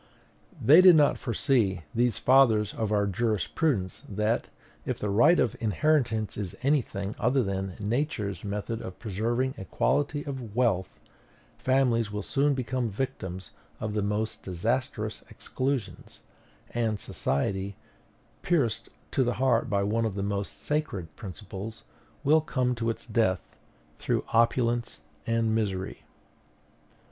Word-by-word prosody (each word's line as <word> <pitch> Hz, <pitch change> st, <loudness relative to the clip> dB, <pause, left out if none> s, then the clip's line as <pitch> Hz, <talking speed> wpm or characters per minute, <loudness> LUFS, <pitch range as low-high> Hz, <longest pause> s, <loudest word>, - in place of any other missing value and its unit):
They 155 Hz, +6 st, +8 dB
did 185 Hz, -2 st, +9 dB
not 150 Hz, -2 st, +4 dB
foresee, 110 Hz, -6 st, +1 dB
these 120 Hz, -2 st, +1 dB
fathers 115 Hz, -6 st, +4 dB
of 110 Hz, -2 st, -2 dB
our 105 Hz, -1 st, +2 dB
jurisprudence, 105 Hz, -, 0 dB
that, 105 Hz, +3 st, 0 dB, 0.3 s
if -, -, -2 dB
the 105 Hz, -, -2 dB
right 120 Hz, -, +5 dB
of 115 Hz, -, +1 dB
inheritance 115 Hz, -, +1 dB
is 100 Hz, -4 st, -4 dB
any 140 Hz, +1 st, +4 dB
thing 100 Hz, -2 st, -5 dB
other 130 Hz, 0 st, +2 dB
than 95 Hz, -2 st, -3 dB
Nature's 105 Hz, -2 st, -2 dB
method 105 Hz, +2 st, -3 dB
of 95 Hz, -, -7 dB
preserving 120 Hz, +5 st, -1 dB
equality 145 Hz, -, 0 dB
of 130 Hz, -7 st, -6 dB
wealth, 100 Hz, -7 st, +2 dB, 0.7 s
families 125 Hz, -4 st, +2 dB
will 105 Hz, -1 st, -3 dB
soon 140 Hz, +4 st, +1 dB
become 125 Hz, -1 st, -1 dB
victims 95 Hz, -, -4 dB, 0.3 s
of 110 Hz, -1 st, -3 dB
the 105 Hz, -, 0 dB
most 105 Hz, +2 st, -2 dB
disastrous 115 Hz, +8 st, -2 dB
exclusions; 130 Hz, -8 st, -4 dB, 0.5 s
and 110 Hz, -3 st, -1 dB
society, 95 Hz, +9 st, -2 dB, 0.7 s
pierced 120 Hz, -10 st, 0 dB, 0.2 s
to 135 Hz, -, +2 dB
the 120 Hz, 0 st, 0 dB
heart 130 Hz, -1 st, +2 dB
by 100 Hz, -2 st, +1 dB
one 115 Hz, +3 st, +1 dB
of 105 Hz, -3 st, -3 dB
its 100 Hz, -, -1 dB
most 100 Hz, 0 st, -3 dB
sacred 100 Hz, -, -2 dB
principles, 100 Hz, +1 st, -8 dB, 0.4 s
will 155 Hz, +3 st, +5 dB
come 130 Hz, -6 st, 0 dB
to 115 Hz, -1 st, -2 dB
its 115 Hz, -, -4 dB
death 105 Hz, -6 st, 0 dB, 0.4 s
through -, -, -1 dB
opulence 115 Hz, +1 st, +2 dB, 0.3 s
and 115 Hz, -1 st, +1 dB
misery. 95 Hz, -4 st, -2 dB
115 Hz, 130 wpm, -28 LUFS, 100-130 Hz, 0.7 s, did